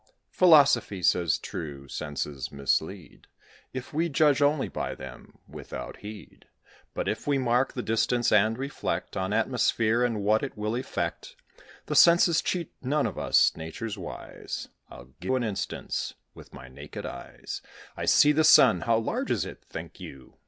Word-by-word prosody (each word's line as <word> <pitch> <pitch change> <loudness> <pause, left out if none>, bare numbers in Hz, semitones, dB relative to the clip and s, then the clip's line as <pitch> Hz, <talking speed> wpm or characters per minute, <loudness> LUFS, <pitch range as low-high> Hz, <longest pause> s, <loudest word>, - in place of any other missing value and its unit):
Philosophy 140 - +4
says 85 -1 +3
true, 70 -4 -7
senses 70 -1 -5
mislead, 80 +5 -3 0.4
If 130 +2 -7
we 165 +3 0
judge 150 -2 +3
only 145 0 +2
by - - -4
them 65 -2 -11
without 65 - -8
heed; 105 0 -11 0.5
But - - -2
if - - -3
we 145 -1 +2
mark 125 0 +1
the 125 - -4
distance 120 +2 +1
and 110 +2 +3
reflect 135 +2 -4
On 95 +1 -2
atmosphere 115 0 +1
and 115 -4 -1
what 110 +2 +3
it 135 -5 -5
will 105 +1 -2
effect, 125 - -4 0.5
The - - -3
senses 170 -1 +6
cheat 175 -3 -3
none 140 +3 0
of - - -4
us; - - +3
Nature's 80 +7 -6
wise: 95 -5 -7 0.2
I'll 65 0 -13
give 130 - -1
an 130 - 0
instance. 105 -4 -4 0.2
With - - -14
my 65 - -11
naked 65 - -9
eyes - - -7 0.3
I - - -4
see 145 - +6
the 155 +1 +2
sun; 135 -6 +6
how 115 -1 +2
large 110 - -2
is - - 0
it, - - -10
think - - -8
you? 70 -1 -11
115 Hz, 160 wpm, -27 LUFS, 90-135 Hz, 0.5 s, senses